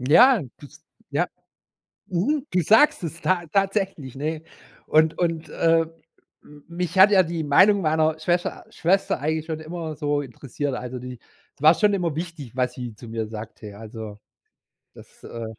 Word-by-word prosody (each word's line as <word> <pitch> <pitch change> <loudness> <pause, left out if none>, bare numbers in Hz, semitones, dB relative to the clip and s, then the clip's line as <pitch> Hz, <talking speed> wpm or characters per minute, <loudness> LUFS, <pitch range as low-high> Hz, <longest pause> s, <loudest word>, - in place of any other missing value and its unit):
Ja, 205 - +6 0.2
das 145 - -15 0.3
ja. - - +1 0.8
Mhm, 265 - -1
du 180 - +2
sagst 220 - +4
es 165 0 -6
ta 175 -2 0
tatsächlich, 195 - -1
ne, 155 +3 -3 0.4
und 160 +1 +3
und, 165 -3 -1
äh, 165 +2 +2 0.6
m 145 -1 -17
mich 175 +2 -4
hat 195 +2 +8
ja 190 -2 +6
die 165 0 -3
Meinung 190 +8 +5
meiner 155 -1 +1
Schwescher 175 +2 -1
Schwester 190 +4 +1
eigentlich 155 +2 -2
schon 160 -1 -4
immer 160 -1 -6
so 145 -1 0
interessiert, 140 +1 -5
also 125 0 -5
die 125 -1 -8 0.4
es - - -18
war 155 +2 +7
schon 210 +1 +2
immer 175 -6 -1
wichtig, 160 -7 -6
was 125 -1 -1
sie 120 -3 -7
zu 115 +1 -12
mir 110 -1 -3
sagte, 110 0 -9
ja 100 - -12
also 110 -1 -8 0.8
das, - - -17
äh 115 -1 -7
160 Hz, 165 wpm, -24 LUFS, 130-180 Hz, 0.8 s, hat